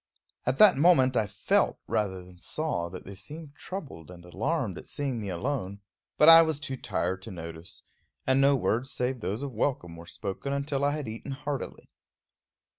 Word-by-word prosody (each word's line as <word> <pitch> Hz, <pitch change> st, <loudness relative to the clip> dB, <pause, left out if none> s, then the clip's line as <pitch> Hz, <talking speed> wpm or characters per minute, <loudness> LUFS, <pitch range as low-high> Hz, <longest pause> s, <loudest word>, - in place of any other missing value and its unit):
At 125 Hz, +1 st, +1 dB
that 205 Hz, -8 st, +8 dB
moment 135 Hz, -5 st, +5 dB
I 110 Hz, -3 st, +2 dB
felt -, -, +1 dB
rather 95 Hz, -4 st, -1 dB
than 90 Hz, -1 st, -16 dB
saw 145 Hz, -, -2 dB
that 90 Hz, +1 st, -9 dB
they 100 Hz, -, -8 dB
seemed 145 Hz, -, -8 dB
troubled 145 Hz, -, -8 dB
and 90 Hz, -1 st, -12 dB
alarmed 110 Hz, -, -2 dB
at -, -, -12 dB
seeing 135 Hz, -5 st, -3 dB
me 100 Hz, -, -4 dB
alone; 100 Hz, +1 st, -3 dB, 0.4 s
but 150 Hz, -, +6 dB
I 165 Hz, 0 st, +11 dB
was 160 Hz, -3 st, 0 dB
too 145 Hz, -3 st, -4 dB
tired 95 Hz, -6 st, -2 dB
to 105 Hz, -, -9 dB
notice, 85 Hz, -2 st, -7 dB, 0.4 s
and 130 Hz, +1 st, +3 dB
no 140 Hz, +1 st, +5 dB
words 125 Hz, 0 st, 0 dB
save 125 Hz, 0 st, -1 dB
those 110 Hz, +4 st, -3 dB
of 140 Hz, -2 st, -5 dB
welcome 105 Hz, -8 st, -1 dB
were 85 Hz, 0 st, -11 dB
spoken 105 Hz, +7 st, -4 dB
until 140 Hz, 0 st, -1 dB
I 145 Hz, 0 st, +2 dB
had 150 Hz, -5 st, -4 dB
eaten 115 Hz, +5 st, -6 dB
heartily. 140 Hz, 0 st, -5 dB
125 Hz, 185 wpm, -28 LUFS, 95-145 Hz, 0.4 s, I